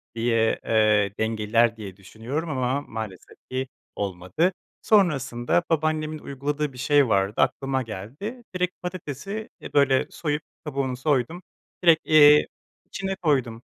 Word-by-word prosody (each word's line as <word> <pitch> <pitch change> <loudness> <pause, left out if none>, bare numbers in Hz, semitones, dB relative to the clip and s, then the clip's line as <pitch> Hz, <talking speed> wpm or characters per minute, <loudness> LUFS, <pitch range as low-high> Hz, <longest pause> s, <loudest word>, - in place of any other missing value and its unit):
diye, 115 -1 +1
ııı, 105 -2 +3
dengeler 110 +1 +2
diye 100 -4 -8
düşünüyorum 120 - -5
ama 130 0 0
maalesef 110 -8 -8
ki 130 +1 -2 0.3
olmadı. 95 - -1 0.3
Sonrasında 145 - +2
babaannemin 155 -1 0
uyguladığı 145 +1 -3
bir - - -13
şey 145 +1 +3
vardı 100 -2 +1
aklıma 135 0 0
geldi, 130 - -7
direkt 180 0 0
patatesi, 180 - -5
e, - - -9
böyle 135 -2 +3
soyup 150 -2 -2 0.2
kabuğunu 135 -3 -2
soydum, 145 +4 0 0.4
direkt, 165 -2 +6
eee, 150 -1 +7 0.4
içine 195 0 -4
koydum, 130 -10 0
135 Hz, 120 wpm, -25 LUFS, 115-155 Hz, 0.4 s, eee